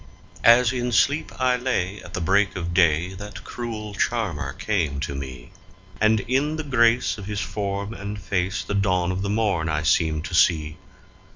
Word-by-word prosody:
As 120 +1 +6
in 125 -1 -2
sleep 140 +9 +2
I 130 -1 +3
lay 105 -6 -2
at 90 - -9
the 90 - -3
break 100 +4 +2
of 85 -2 -4
day 85 +1 +3
that 100 +1 -9
cruel 110 -3 -6
charmer 105 -8 -1
came 80 -10 -1
to 70 -1 -3
me, 65 -1 -8 0.5
And 110 -1 +4
in 135 +7 0
the 155 - -4
grace 120 -4 +2
of 100 - -8
his 105 -1 -3
form 100 +1 -3
and 100 0 -6
face 95 0 -1
the 95 - -4
dawn 90 -3 +1
of 95 +1 -3
the 100 - -2
morn 100 -7 0
I 75 0 -1
seemed 80 0 +1
to - - -7
see. 80 -3 +2
100 Hz, 180 wpm, -24 LUFS, 85-115 Hz, 0.5 s, As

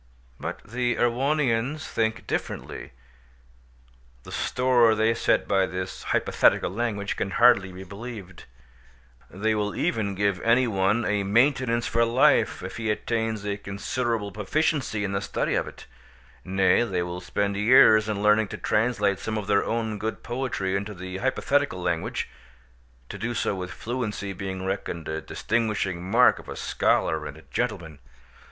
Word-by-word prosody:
But - - -5
the 120 +2 -1
Erewhonians 135 +2 0
think 110 0 -1
differently; - - -4 1.3
the - - -11
store 125 -3 +3
they 110 +1 +2
set 115 - +1
by 95 -1 +2
this 95 0 -5
hypothetical - - +2
language 105 -1 -2
can 100 - -2
hardly 100 -3 +4
be 95 +1 -9
believed; 100 -1 -9 0.8
they 110 +3 -1
will 105 -2 -1
even 100 -3 -1
give 100 -1 0
any 120 +3 +4
one 105 +1 +1
a 105 -1 +1
maintenance 120 +3 +2
for 115 +1 +2
life 115 -4 +3
if 95 +4 -6
he 110 -1 -2
attains 110 -1 -1
a 100 -1 -2
considerable 105 +2 -3
proficiency 110 +1 -1
in 100 - -2
the 100 0 -1
study - - -2
of - - 0
it; - - -11 0.6
nay, 95 +1 +3
they 95 -7 -1
will 90 +1 -5
spend 100 +2 -1
years 110 0 +6
in 105 -1 -2
learning 105 0 +4
to - - -7
translate 105 -3 +1
some 110 +1 -3
of 105 - -3
their 100 0 +2
own 110 -2 -2
good 110 +1 -4
poetry 120 -6 -2
into 100 +1 -3
the 95 +1 -6
hypothetical 135 -1 0
language—to - - -6
do 120 +3 -3
so 105 - 0
with 90 -1 -5
fluency 110 -2 -4
being 95 0 -5
reckoned 95 -4 -4
a 80 0 -3
distinguishing 105 -6 -1
mark 115 +7 +4
of - - -12
a - - -5
scholar 80 -1 0
and 70 - -9
a 80 - -15
gentleman. 85 - -3
105 Hz, 150 wpm, -25 LUFS, 95-115 Hz, 1.3 s, years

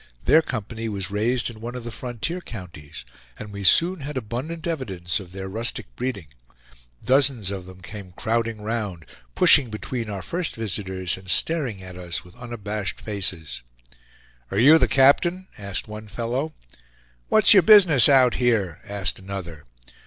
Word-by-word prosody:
Their 160 - +6
company 115 -4 -5
was 100 -2 -4
raised 120 +4 0
in 110 -1 -14
one 120 +2 -6
of 125 - -6
the 120 - -6
frontier 125 - -5
counties, 90 - -10 0.3
and 105 -1 -9
we 100 0 -6
soon 170 - +5
had 145 0 -6
abundant 130 - -5
evidence 105 - -3
of 90 -3 -11
their 95 0 -6
rustic 95 - -5
breeding; 125 -9 -4 0.8
dozens 130 -6 +3
of 95 -2 -6
them 95 0 -13
came 95 +1 -9
crowding 115 +2 -2
round, 105 -7 -4 0.3
pushing 135 -5 +6
between 115 +1 -5
our 100 -3 -5
first 175 -1 -3
visitors 95 -4 -4
and 95 0 -13
staring 130 - 0
at 90 -1 -10
us 90 -2 -3
with 90 - -16
unabashed 105 -4 -5
faces. 90 - -2 0.9
"Are 95 - -4
you 145 +9 +7
the - - +3
captain?" 170 +8 +3
asked 100 -1 -5
one 105 0 -9
fellow. 120 +8 -3 0.7
"What's 215 - +7
your 195 - +7
business 170 - +7
out 130 -3 +5
here?" 105 -9 +1
asked 100 -1 -3
another. 95 -5 -8
110 Hz, 155 wpm, -23 LUFS, 95-130 Hz, 0.9 s, you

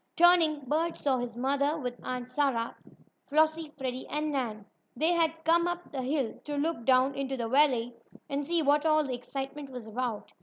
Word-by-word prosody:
Turning, 335 -3 +5
Bert 315 +5 -1
saw 265 -3 +1
his 240 -1 -4
mother, 280 +4 +1
with 250 -5 -3
Aunt 250 -1 -4
Sarah, 255 -4 0 0.5
Flossie, 315 +1 +2
Freddie 260 -2 -4
and 300 +1 -2
Nan. 225 -7 -3 0.3
They 315 +7 +2
had 325 -1 +1
come 340 +1 +4
up 350 0 -4
the 270 - -3
hill 265 -2 -1
to 290 -1 -3
look 295 -5 -1
down 260 +1 +4
into 270 -1 -3
the 235 -2 -2
valley 250 -2 +3 0.3
and 285 -1 -2
see 335 +2 +1
what 290 +1 +3
all 310 -1 +4
the 265 -3 -3
excitement 270 +3 -6
was 250 -3 -8
about. 225 0 -4
280 Hz, 185 wpm, -29 LUFS, 255-310 Hz, 0.5 s, Turning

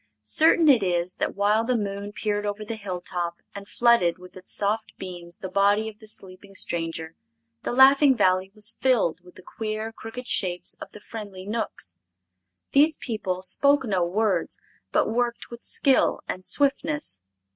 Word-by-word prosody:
Certain 315 - +4
it 265 -6 +6
is 180 -1 0
that - - -1
while 205 +3 +2
the 245 +1 +1
moon 200 -1 -4
peered 205 0 -2
over 205 +1 -4
the 225 - -4
hilltop 180 -4 -4 0.2
and 200 0 -9
flooded 235 -9 +3
with 180 0 -14
its 185 0 -8
soft 215 +2 0
beams 175 -2 -7
the 190 - -6
body 200 +3 +2
of 215 -1 -9
the 215 - -15
sleeping 195 -1 -8
stranger, 165 -2 -3 0.5
the - - -3
Laughing 265 +1 +6
Valley 185 -2 +2
was 215 +2 -3
filled 210 -11 +2
with 180 - -17
the 185 - -14
queer, 215 +2 -4
crooked 225 +3 -8
shapes 180 -5 -1
of - - -8
the - - -12
friendly 205 -3 -9
Knooks. 210 - -4 0.8
These 295 +2 +4
people 190 -6 -3
spoke 280 +9 +4
no 190 -5 +1
words, 200 +4 0 0.3
but - - +2
worked 235 +2 -2
with 235 - -9
skill 270 -2 +2
and 185 - -5
swiftness. 285 - 0
205 Hz, 165 wpm, -25 LUFS, 185-230 Hz, 0.8 s, it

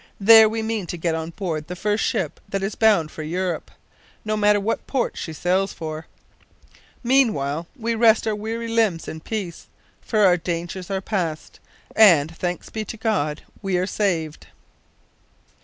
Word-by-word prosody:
There 220 +1 +8
we 220 0 -3
mean 220 -4 -2
to 175 - -5
get 165 0 -1
on 160 0 -3
board 165 -4 -4
the 180 - -6
first 210 +3 0
ship 165 -6 -1
that 195 0 -2
is 195 +2 -2
bound 205 -9 +3
for - - -8
Europe 175 +3 -3 0.6
no 215 0 0
matter 210 -1 +3
what 210 +3 -2
port 265 -3 -1
she 160 - -5
sails 185 +5 0
for. 155 0 -6 1.0
Meanwhile 175 - +1
we 230 -3 -2
rest 225 -1 +4
our 220 - 0
weary 225 +2 -4
limbs 225 -7 +1
in 160 - -6
peace, 185 -1 -5 0.3
for 215 -2 0
our 185 -3 +5
dangers 175 +2 -4
are 190 -1 -2
past, 175 -7 -3 0.4
and 165 -7 +5
thanks 180 +1 -4
be 220 - -3
to 225 - -7
God 195 -10 -1 0.2
we 190 -2 0
are 180 - 0
saved." 170 -7 -2
190 Hz, 165 wpm, -22 LUFS, 165-220 Hz, 1.0 s, There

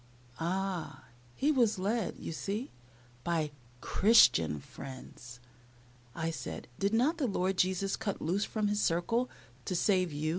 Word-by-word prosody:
Ah! 175 -5 -2 0.3
he 290 +3 +2
was 235 -8 +3
led, 205 +2 -1
you - - -6
see, 205 - -3 0.5
by 160 -3 0 0.3
"Christian 120 - +5
friends." 125 - -10 0.8
I 165 0 -1
said, 160 - -6
"Did 200 +3 +1
not 295 +9 +2
the 270 - +1
Lord 190 -2 0
Jesus 190 +2 +1
cut 215 -3 -3
loose 185 +6 0
from 215 -1 -1
His 205 0 +1
circle 230 +9 +1 0.4
to 185 - -2
save 185 -1 +2
you? 150 +2 -2
190 Hz, 140 wpm, -32 LUFS, 165-215 Hz, 0.8 s, Christian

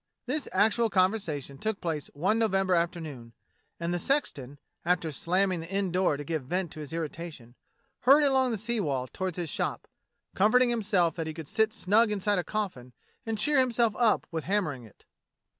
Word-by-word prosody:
This 280 +4 -2
actual 220 +4 +3
conversation 185 -9 0
took 220 -2 -2
place 160 -4 -3
one 195 +9 +1
November 195 -4 +2
afternoon, 160 -9 -2 0.5
and 170 +1 -2
the 175 - -1
sexton, 145 - -1 0.3
after 170 -2 +1
slamming 185 +4 0
the 165 +1 -8
inn 195 -1 -1
door 180 -5 +2
to 145 - -5
give 155 -1 -3
vent 180 +3 -2
to - - -8
his 150 -2 -7
irritation, 160 -6 -6 0.5
hurried 280 +4 +6
along 265 -2 +3
the 225 - -1
sea 230 +3 -2
wall 135 -9 -1
toward 185 +7 -4
his 170 -4 -4
shop, - - -3 0.5
comforting 240 +5 +4
himself 200 -7 +1
that 165 -1 -2
he 155 - -5
could 160 -3 -7
sit 220 +4 +2
snug 220 +1 +3
inside 205 -1 +1
a - - -1
coffin 170 - -4 0.3
and 225 -1 -1
cheer 295 +6 +2
himself 235 -4 +2
up 230 -4 +2
with 160 -2 -3
hammer 195 -5 +1
ing 125 -3 -11
it. 110 - -20
185 Hz, 185 wpm, -28 LUFS, 160-220 Hz, 0.5 s, hurried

